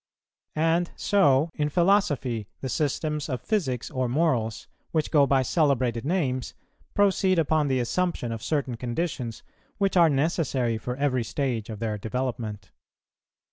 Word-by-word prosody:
And 165 +2 +2
so 155 -6 +3
in 150 0 -1
philosophy, 150 - +1
the 130 - -3
systems 150 +2 -1
of 130 -2 -2
physics 135 - -2
or 130 -1 -1
morals, 125 -6 0 0.2
which 155 -2 -1
go 145 -3 +5
by 135 -1 +3
celebrated 130 -5 +1
names, 140 -7 -1 0.4
proceed 195 -2 +3
upon 155 -2 +2
the 130 -2 +1
assumption 125 0 -1
of 115 -1 -4
certain 135 -5 -1
conditions 125 -2 -3 0.3
which 195 -1 +1
are 170 -2 +6
necessary 135 -6 0
for 125 +2 -4
every 130 -3 0
stage 120 -4 -2
of 110 - -5
their 110 -1 -3
development. 110 -3 -4
135 Hz, 140 wpm, -26 LUFS, 120-165 Hz, 0.4 s, are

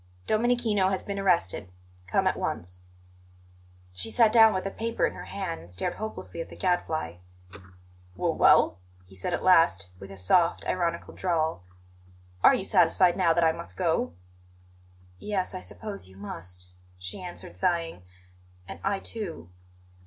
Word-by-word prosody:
"DOMENICHINO 220 -3 +2
HAS 190 -1 -1
BEEN 200 -1 -4
ARRESTED. 170 - +1 0.4
COME - - +1
AT - - +2
ONCE." 90 +1 -4 1.1
She 90 0 -5
sat 225 -3 +4
down 225 -1 +7
with 185 -2 -2
the 195 - -3
paper 230 +2 -1
in - - -2
her - - -8
hand 185 -4 -4
and 85 - -13
stared 95 - -2
hopelessly 165 - -6
at - - -7
the - - -11
Gadfly. 160 - -1 1.0
"W - - 0
well?" 85 - +5 0.3
he 95 - -18
said 95 - -4
at 175 - -2
last, 165 - +4
with 95 - -10
his 95 -2 -7
soft, 175 - +3
ironical 170 -2 -1
drawl; 160 - -1 0.8
"are - - +8
you - - -3
satisfied 180 -2 +4
now 180 -3 +3
that 170 +1 +3
I 160 - +5
must 170 +1 -8
go?" 160 - 0 1.0
"Yes, 195 -3 -2
I 185 - -4
suppose 200 - -7
you 95 0 -17
must," 90 -2 -8 0.2
she 90 - -8
answered, 180 -1 -9
sighing. 170 - -1 0.7
"And - - -8
I 195 0 +1
too." 180 - -6
170 Hz, 155 wpm, -27 LUFS, -, 1.1 s, are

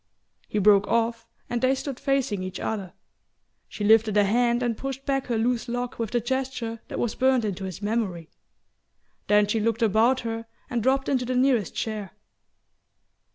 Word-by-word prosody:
He - - -3
broke 205 0 +5
off 230 0 0 0.2
and 240 -1 -2
they 260 +1 +3
stood 270 -1 -5
facing 270 -8 0
each 185 0 -5
other. 200 -5 -4 0.8
She 210 - -6
lifted 220 0 +4
a 205 - +6
hand 240 +4 +2
and 235 -2 0
pushed 270 +2 -5
back 270 -1 -1
her 235 -2 0
loose 235 +1 0
lock 245 0 -4
with 225 -2 -1
the 240 - +1
gesture 240 -2 -3
that - - -6
was 235 -2 -1
burnt 260 -3 +2
into 195 -2 -3
his 190 +2 -7
memory; 205 -7 -2 1.0
then 210 0 +5
she 210 +2 0
looked 230 +2 0
about 225 +4 +3
her 225 0 -4 0.2
and 240 -1 0
dropped 265 +3 +1
into 260 -3 +1
the 255 +1 -2
nearest 250 -6 +2
chair. 210 -5 -4
230 Hz, 175 wpm, -25 LUFS, 210-250 Hz, 1.0 s, a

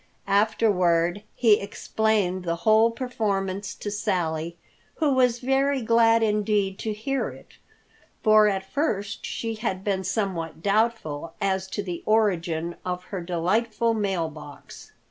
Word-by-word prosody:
Afterward 195 -4 +2
he 220 -4 +4
explained 200 -2 -1
the 170 -1 -1
whole 220 +1 +6
performance 200 -5 -2
to 205 - -5
Sally, 170 -5 -2 0.4
who 300 -4 +1
was 250 -2 +3
very 270 +1 +1
glad 230 0 +4
indeed 210 -2 0
to 220 - -2
hear 245 +6 -2
it, - - -14 0.7
for 215 -1 +6
at 190 -2 -1
first 210 -6 -2
she 225 -1 -3
had 215 -4 -3
been 195 -2 -1
somewhat 185 -5 -3
doubtful 200 -8 0
as 190 -2 0
to 200 +2 -4
the 175 -3 -5
origin 175 -6 +1
of 180 0 -3
her 190 - -2
delightful 215 +7 0
mail 195 -6 -1
box. 150 -2 -12
205 Hz, 130 wpm, -25 LUFS, 180-225 Hz, 0.7 s, whole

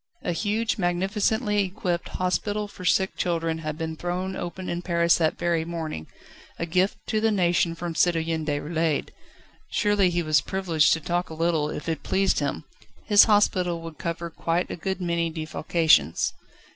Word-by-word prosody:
A 180 - -1
huge, 220 +5 -1
magnificently 205 +4 +1
equipped 180 -2 -3
hospital 205 +3 -1
for 200 - -12
sick 190 +1 +2
children 165 -2 -1
had 155 -1 -4
been 160 -1 -4
thrown 180 +3 -3
open 180 +1 -5
in 175 0 -2
Paris 170 -1 +2
that 160 -2 +1
very 170 -1 0
morning, 160 - -5 0.5
a 170 - -2
gift 185 +4 +1
to 215 - 0
the 225 - +3
nation 175 -4 +2
from 170 0 -4
Citoyen 165 -1 +1
Déroulède. 155 +1 -1 0.6
Surely 205 -3 +2
he 175 0 -1
was 155 -1 +3
privileged 165 -6 +2
to 165 - 0
talk 175 +3 -2
a 160 - -7
little, 160 -2 +1
if 150 - -6
it 165 -1 -2
pleased 195 0 +1
him. 145 +1 -2 0.4
His 205 -1 +7
hospital 185 -5 +2
would 165 -1 -9
cover 170 0 -4
quite 165 +2 -1
a - - -3
good 190 +3 -3
many 170 -1 0
defalcations. 155 - +2
170 Hz, 165 wpm, -25 LUFS, 160-190 Hz, 0.6 s, His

